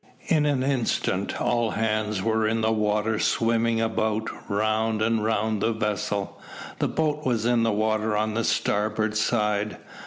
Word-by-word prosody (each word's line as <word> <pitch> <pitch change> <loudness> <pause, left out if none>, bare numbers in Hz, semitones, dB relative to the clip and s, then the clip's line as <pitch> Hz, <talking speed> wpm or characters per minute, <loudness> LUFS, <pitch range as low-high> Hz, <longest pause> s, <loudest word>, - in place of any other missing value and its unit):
In 150 -3 +3
an 140 -3 +1
instant 135 -4 -1
all 120 -1 +1
hands 110 -2 -1
were 110 -1 +1
in 115 +1 0
the 110 0 +2
water 105 0 0
swimming 115 0 +1
about 110 -1 -1 0.2
round 110 +1 0
and 110 0 +1
round 110 -1 0
the 115 - +1
vessel. 105 -2 -2 0.4
The - - +1
boat 150 -1 -1
was 120 -5 0
in 120 -1 +3
the 115 0 +2
water 110 0 0
on 110 0 0
the 115 +1 0
starboard 105 +1 0
side. 105 -1 0
110 Hz, 155 wpm, -25 LUFS, 105-115 Hz, 0.4 s, In